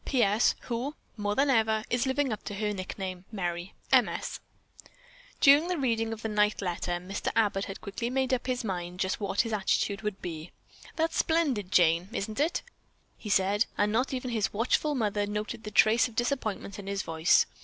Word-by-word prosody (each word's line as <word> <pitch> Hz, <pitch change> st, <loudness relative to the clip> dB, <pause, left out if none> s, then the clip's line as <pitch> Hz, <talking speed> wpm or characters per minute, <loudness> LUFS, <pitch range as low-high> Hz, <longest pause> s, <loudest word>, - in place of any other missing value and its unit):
"P. 255 Hz, -4 st, +2 dB
S. 205 Hz, +3 st, +3 dB
Who, 250 Hz, +5 st, -3 dB, 0.2 s
more 205 Hz, -2 st, -1 dB
than 275 Hz, 0 st, +3 dB
ever, 220 Hz, -2 st, +2 dB
is 245 Hz, +2 st, +1 dB
living 265 Hz, -2 st, +1 dB
up 215 Hz, -, -7 dB
to 205 Hz, -, -5 dB
her 210 Hz, +1 st, -1 dB
nickname, 185 Hz, -1 st, -5 dB
Merry. 175 Hz, -3 st, -4 dB, 0.2 s
M. -, -, +6 dB
S." -, -, -5 dB, 1.0 s
During 290 Hz, +4 st, +6 dB
the 360 Hz, -1 st, -1 dB
reading 225 Hz, -5 st, 0 dB
of 225 Hz, 0 st, -6 dB
the -, -, 0 dB
"night 210 Hz, -1 st, +2 dB
letter" 175 Hz, -1 st, -2 dB
Mr. 180 Hz, +3 st, -3 dB
Abbott 205 Hz, -3 st, +2 dB
had 195 Hz, -, -8 dB
quickly 220 Hz, +3 st, -4 dB
made 265 Hz, 0 st, 0 dB
up 255 Hz, 0 st, -1 dB
his 250 Hz, -1 st, -1 dB
mind 180 Hz, -3 st, -4 dB
just 190 Hz, -, -1 dB
what 200 Hz, -1 st, +1 dB
his 230 Hz, -2 st, -3 dB
attitude 200 Hz, 0 st, 0 dB
would 210 Hz, -2 st, -3 dB
be. 165 Hz, -1 st, -6 dB, 0.4 s
"That's 325 Hz, 0 st, 0 dB
splendid, 275 Hz, -, +1 dB
Jane, 170 Hz, +1 st, +4 dB
isn't 215 Hz, +4 st, -3 dB
it?" 320 Hz, +4 st, +1 dB, 0.5 s
he 210 Hz, -, -8 dB
said, 200 Hz, +2 st, +3 dB
and 205 Hz, 0 st, +2 dB
not 250 Hz, +5 st, +1 dB
even 255 Hz, -1 st, -3 dB
his 220 Hz, -3 st, 0 dB
watchful 255 Hz, +7 st, +1 dB
mother 210 Hz, -4 st, 0 dB
noted 215 Hz, +2 st, -4 dB
a -, -, -2 dB
trace 220 Hz, +3 st, +5 dB
of 235 Hz, -, -14 dB
disappointment 225 Hz, -5 st, -2 dB
in 200 Hz, -, -8 dB
his 200 Hz, -1 st, -2 dB
voice. 160 Hz, +1 st, +3 dB
215 Hz, 195 wpm, -29 LUFS, 195-245 Hz, 1.0 s, M